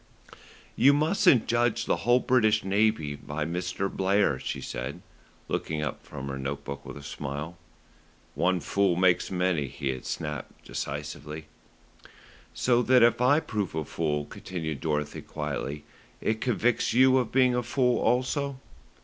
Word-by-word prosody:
"You 140 Hz, +3 st, +6 dB
mustn't 155 Hz, -, +4 dB
judge 120 Hz, 0 st, +1 dB
the -, -, +1 dB
whole 120 Hz, +1 st, +3 dB
British 110 Hz, -4 st, +3 dB
Navy 100 Hz, -6 st, +1 dB
by 75 Hz, +2 st, -4 dB
Mr. 90 Hz, +3 st, -2 dB
Blair," 95 Hz, -7 st, +1 dB
she -, -, -4 dB
said, 65 Hz, +4 st, -5 dB, 0.4 s
looking 80 Hz, -1 st, -2 dB
up 75 Hz, -, -4 dB
from 70 Hz, 0 st, -7 dB
her 70 Hz, 0 st, -4 dB
note 70 Hz, +1 st, -4 dB
book 70 Hz, -1 st, -6 dB
with -, -, -8 dB
a 70 Hz, -, -10 dB
smile. 75 Hz, +4 st, -5 dB, 0.8 s
"One 90 Hz, 0 st, +1 dB
fool 100 Hz, +4 st, +1 dB
makes 90 Hz, 0 st, +3 dB
many," 90 Hz, -6 st, 0 dB
he 70 Hz, +2 st, -4 dB
had 65 Hz, -1 st, -4 dB
snapped 75 Hz, -2 st, -5 dB
decisively. 75 Hz, +2 st, -5 dB, 1.1 s
"So 120 Hz, -1 st, +2 dB
that 125 Hz, 0 st, +5 dB
if 120 Hz, +1 st, +4 dB
I 140 Hz, +5 st, +4 dB
prove 105 Hz, -, -3 dB
a 80 Hz, -1 st, -2 dB
fool," 75 Hz, -1 st, -1 dB
continued 80 Hz, -5 st, -5 dB
Dorothy 75 Hz, -1 st, -2 dB
quietly, 75 Hz, -1 st, -4 dB, 0.4 s
"it 110 Hz, 0 st, -1 dB
convicts 120 Hz, 0 st, +1 dB
you 130 Hz, +2 st, +6 dB
of 120 Hz, -3 st, -2 dB
being 130 Hz, -1 st, +4 dB
a 125 Hz, -, +1 dB
fool 125 Hz, 0 st, +1 dB
also." 130 Hz, +3 st, 0 dB
95 Hz, 150 wpm, -27 LUFS, 75-120 Hz, 1.1 s, You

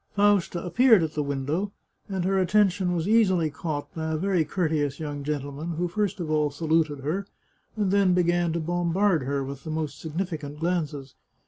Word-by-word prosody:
Fausta 200 Hz, -4 st, +2 dB
appeared 225 Hz, 0 st, +5 dB
at 160 Hz, -1 st, -3 dB
the 150 Hz, -, -1 dB
window, 145 Hz, +7 st, -2 dB, 0.4 s
and 190 Hz, -3 st, -2 dB
her 190 Hz, 0 st, +2 dB
attention 185 Hz, -1 st, +2 dB
was 165 Hz, +1 st, -1 dB
easily 190 Hz, -8 st, +3 dB
caught 150 Hz, -1 st, -4 dB
by 160 Hz, -1 st, -3 dB
a -, -, 0 dB
very 185 Hz, 0 st, +1 dB
courteous 150 Hz, -3 st, -1 dB
young 145 Hz, -2 st, -4 dB
gentleman, 145 Hz, +3 st, -3 dB
who 175 Hz, +2 st, 0 dB
first 205 Hz, +3 st, -1 dB
of 160 Hz, -3 st, -3 dB
all 150 Hz, -1 st, +2 dB
saluted 155 Hz, -1 st, 0 dB
her, 180 Hz, +8 st, -2 dB, 0.5 s
and 200 Hz, -3 st, +1 dB
then 195 Hz, -2 st, +4 dB
began 175 Hz, -1 st, +2 dB
to 170 Hz, -, -1 dB
bombard 175 Hz, +2 st, +1 dB
her 140 Hz, +1 st, -1 dB
with 140 Hz, 0 st, -7 dB
most 155 Hz, -2 st, -3 dB
significant 160 Hz, -3 st, -4 dB
glances. 155 Hz, -6 st, -2 dB
165 Hz, 175 wpm, -26 LUFS, 150-185 Hz, 0.5 s, appeared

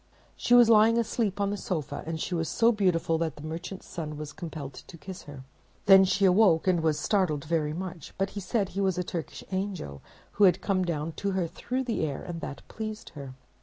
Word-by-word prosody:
She 245 Hz, -, +3 dB
was 240 Hz, -1 st, +8 dB
lying 225 Hz, +1 st, +6 dB
asleep 220 Hz, -3 st, 0 dB
on 200 Hz, 0 st, +1 dB
the 205 Hz, -, -2 dB
sofa, 170 Hz, -6 st, -3 dB
and 160 Hz, -1 st, -3 dB
she 180 Hz, -, -3 dB
was 165 Hz, -2 st, -1 dB
so 230 Hz, +1 st, +4 dB
beautiful 180 Hz, -6 st, +1 dB
that 160 Hz, -3 st, -1 dB
the 150 Hz, -, -11 dB
Merchant's 165 Hz, +4 st, -6 dB
Son 155 Hz, -3 st, -6 dB
was 150 Hz, -1 st, -7 dB
compelled 155 Hz, -7 st, -7 dB
to 170 Hz, -, -12 dB
kiss 185 Hz, +4 st, -9 dB
her. 140 Hz, -2 st, -9 dB, 0.4 s
Then 195 Hz, -1 st, +8 dB
she 195 Hz, +1 st, +2 dB
awoke, 185 Hz, -3 st, +5 dB
and 180 Hz, -3 st, +3 dB
was 160 Hz, -2 st, +1 dB
startled 175 Hz, -8 st, +1 dB
very 155 Hz, -2 st, 0 dB
much; 175 Hz, -2 st, -6 dB
but 195 Hz, 0 st, -1 dB
he 205 Hz, -, -5 dB
said 200 Hz, +1 st, -1 dB
he 200 Hz, -, -3 dB
was 190 Hz, -2 st, +1 dB
a 180 Hz, -, 0 dB
Turkish 170 Hz, -3 st, -6 dB
angel 185 Hz, -, -4 dB, 0.3 s
who 205 Hz, -, +4 dB
had 180 Hz, -1 st, +4 dB
come 190 Hz, -2 st, 0 dB
down 165 Hz, -2 st, -2 dB
to 200 Hz, -1 st, 0 dB
her 185 Hz, -2 st, 0 dB
through 250 Hz, +10 st, -3 dB
the 235 Hz, -9 st, -1 dB
air, 145 Hz, -3 st, -3 dB
and 170 Hz, -2 st, -6 dB
that 140 Hz, -, -7 dB
pleased 215 Hz, -1 st, -6 dB
her. 140 Hz, -5 st, -9 dB
180 Hz, 220 wpm, -28 LUFS, 160-200 Hz, 0.4 s, was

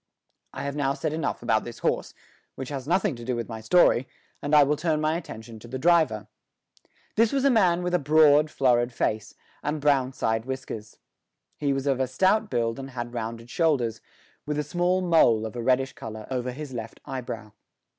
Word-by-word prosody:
I -, -, -6 dB
have 140 Hz, 0 st, -3 dB
now 140 Hz, -2 st, 0 dB
said 155 Hz, -1 st, -2 dB
enough 160 Hz, -6 st, -2 dB
about 110 Hz, -2 st, +2 dB
this 120 Hz, -, -8 dB
horse, -, -, 0 dB, 0.4 s
which 130 Hz, -1 st, -6 dB
has 140 Hz, -2 st, -5 dB
nothing 185 Hz, -1 st, +1 dB
to 120 Hz, -, -9 dB
do 125 Hz, +1 st, -2 dB
with 120 Hz, -1 st, -4 dB
my 110 Hz, -1 st, -7 dB
story, 130 Hz, 0 st, +4 dB, 0.3 s
and 145 Hz, +1 st, +1 dB
I 150 Hz, -, +8 dB
will 145 Hz, +2 st, +2 dB
turn 155 Hz, 0 st, 0 dB
my 155 Hz, +1 st, +1 dB
attention 115 Hz, -9 st, -8 dB
to 120 Hz, -, -12 dB
the 130 Hz, +3 st, -5 dB
driver. 160 Hz, -7 st, +3 dB, 0.9 s
This 225 Hz, 0 st, +4 dB
was 275 Hz, -1 st, +1 dB
a 275 Hz, -, +5 dB
man 180 Hz, -6 st, +3 dB
with 180 Hz, 0 st, -2 dB
a 180 Hz, -, +3 dB
broad, 150 Hz, +1 st, +5 dB
florid 125 Hz, -3 st, +2 dB
face 110 Hz, -2 st, -2 dB, 0.3 s
and 150 Hz, +1 st, -2 dB
brown 140 Hz, -3 st, +2 dB
side 110 Hz, -3 st, -1 dB
whiskers. 130 Hz, -5 st, -6 dB, 0.6 s
He 145 Hz, -2 st, -1 dB
was 135 Hz, 0 st, -1 dB
of 135 Hz, -2 st, +1 dB
a 130 Hz, -, +1 dB
stout 195 Hz, -, +2 dB
build 115 Hz, -3 st, -1 dB
and 135 Hz, 0 st, -7 dB
had 120 Hz, -2 st, -6 dB
rounded 115 Hz, 0 st, -5 dB
shoulders, 130 Hz, -10 st, +1 dB, 0.5 s
with 150 Hz, 0 st, -1 dB
a 150 Hz, -, 0 dB
small 180 Hz, +3 st, +1 dB
mole 160 Hz, -11 st, +4 dB
of 110 Hz, -, -6 dB
a 120 Hz, -, -3 dB
reddish 130 Hz, +2 st, +1 dB
colour 110 Hz, -1 st, -8 dB
over 125 Hz, -1 st, -2 dB
his 140 Hz, +1 st, -7 dB
left 115 Hz, -2 st, -7 dB
eyebrow. 115 Hz, -4 st, -6 dB
135 Hz, 200 wpm, -26 LUFS, 120-155 Hz, 0.9 s, I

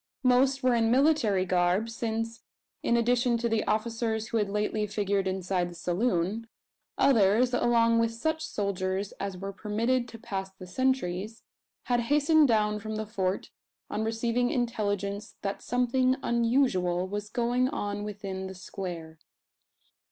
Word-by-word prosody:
Most 260 Hz, +2 st, +3 dB
were 255 Hz, -1 st, +4 dB
in 225 Hz, -1 st, +2 dB
military 245 Hz, -8 st, +3 dB
garb: 180 Hz, +3 st, +2 dB
since, 225 Hz, 0 st, -3 dB, 0.4 s
in 235 Hz, -, +2 dB
addition 240 Hz, 0 st, +2 dB
to 235 Hz, +1 st, -1 dB
the 225 Hz, -1 st, +1 dB
officers 225 Hz, 0 st, -1 dB
who 230 Hz, -, 0 dB
had 210 Hz, -2 st, 0 dB
lately 210 Hz, +1 st, -1 dB
figured 200 Hz, -1 st, 0 dB
inside 185 Hz, -1 st, -1 dB
the 175 Hz, -, -11 dB
saloon, 185 Hz, +4 st, -1 dB, 0.5 s
others, 235 Hz, 0 st, +4 dB
along 230 Hz, -1 st, +3 dB
with 230 Hz, 0 st, +2 dB
such 315 Hz, +8 st, -2 dB
soldiers 195 Hz, -1 st, -2 dB
as 195 Hz, -1 st, -4 dB
were 195 Hz, +2 st, -5 dB
permitted 230 Hz, +5 st, 0 dB
to 230 Hz, -, -10 dB
pass 195 Hz, -4 st, -4 dB
the 190 Hz, -1 st, -12 dB
sentries, 220 Hz, -2 st, -1 dB, 0.4 s
had 245 Hz, -1 st, +1 dB
hastened 295 Hz, +5 st, +4 dB
down 210 Hz, -2 st, +2 dB
from 215 Hz, +1 st, -5 dB
the 215 Hz, 0 st, -3 dB
Fort 190 Hz, -2 st, -2 dB, 0.4 s
on 220 Hz, -, -1 dB
receiving 230 Hz, +2 st, 0 dB
intelligence 205 Hz, -4 st, -2 dB
that 195 Hz, 0 st, -3 dB
something 255 Hz, +1 st, +2 dB
unusual 230 Hz, -7 st, +1 dB
was 205 Hz, +1 st, -4 dB
going 245 Hz, +2 st, +1 dB
on 205 Hz, -6 st, -3 dB
within 195 Hz, -2 st, -5 dB
the 190 Hz, -, -8 dB
"square." 175 Hz, -4 st, -7 dB
220 Hz, 145 wpm, -28 LUFS, 195-240 Hz, 0.5 s, were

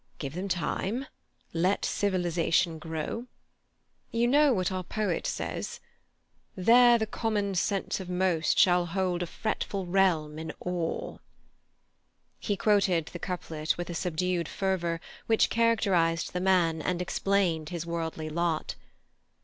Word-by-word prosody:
Give 140 Hz, -2 st, -5 dB
them 185 Hz, +4 st, -3 dB
time; 195 Hz, -, -2 dB, 0.5 s
let 180 Hz, +4 st, +1 dB
civilization 175 Hz, -3 st, +1 dB
grow. 160 Hz, +9 st, -4 dB, 0.8 s
You 230 Hz, +1 st, +1 dB
know 290 Hz, +3 st, +5 dB
what 185 Hz, -5 st, 0 dB
our 185 Hz, -1 st, -2 dB
poet 215 Hz, +4 st, -2 dB
says: -, -, -4 dB, 0.8 s
"There 240 Hz, +5 st, +6 dB
the 220 Hz, -, 0 dB
common 210 Hz, -2 st, -1 dB
sense 195 Hz, +2 st, -1 dB
of 185 Hz, -2 st, -7 dB
most 180 Hz, -3 st, +1 dB
shall 175 Hz, -1 st, +5 dB
hold 180 Hz, 0 st, -1 dB
a 175 Hz, -, -2 dB
fretful 200 Hz, -1 st, -3 dB
realm 175 Hz, -5 st, +1 dB
in 160 Hz, -, -5 dB
awe—"" 175 Hz, -2 st, -3 dB, 1.2 s
He 205 Hz, -2 st, -1 dB
quoted 190 Hz, -7 st, +2 dB
the 175 Hz, -, -6 dB
couplet 160 Hz, -4 st, -3 dB
with 175 Hz, 0 st, -4 dB
a -, -, -4 dB
subdued 175 Hz, 0 st, -1 dB
fervour 175 Hz, -4 st, -1 dB, 0.3 s
which 225 Hz, -1 st, +3 dB
characterized 195 Hz, -8 st, +2 dB
the 180 Hz, -, -1 dB
man 175 Hz, -4 st, +2 dB
and 180 Hz, +2 st, -1 dB
explained 180 Hz, -3 st, 0 dB
his 170 Hz, -2 st, -4 dB
worldly 165 Hz, -2 st, -3 dB
lot. 170 Hz, -1 st, -1 dB
180 Hz, 130 wpm, -28 LUFS, 165-200 Hz, 1.2 s, There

